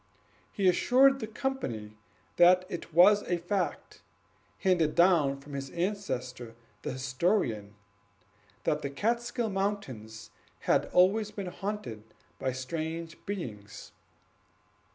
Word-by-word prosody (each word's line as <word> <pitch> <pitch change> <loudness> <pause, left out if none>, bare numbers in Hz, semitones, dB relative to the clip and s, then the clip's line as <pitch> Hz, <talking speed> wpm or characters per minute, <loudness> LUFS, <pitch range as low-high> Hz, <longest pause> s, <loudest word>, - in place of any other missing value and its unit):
He 195 - +1
assured 265 +9 +5
the 220 - -4
company 135 - -4 0.4
that 180 +1 +6
it 170 - -6
was 195 +6 +6
a 175 - -1
fact, 180 +1 -3 0.6
handed 170 - +2
down 165 -6 +4
from 145 +1 -12
his 135 -1 -4
ancestor 130 - -3 0.3
the - - -4
historian, 130 - -1 0.9
that 150 0 0
the 140 - -3
Kaatskill 235 - -1
Mountains 165 - -4 0.3
had - - +2
always 200 +4 +3
been 200 -2 -6
haunted 195 - -5 0.4
by 130 - -1
strange 160 +5 -5
beings. 110 - -6
170 Hz, 110 wpm, -29 LUFS, 130-205 Hz, 0.9 s, that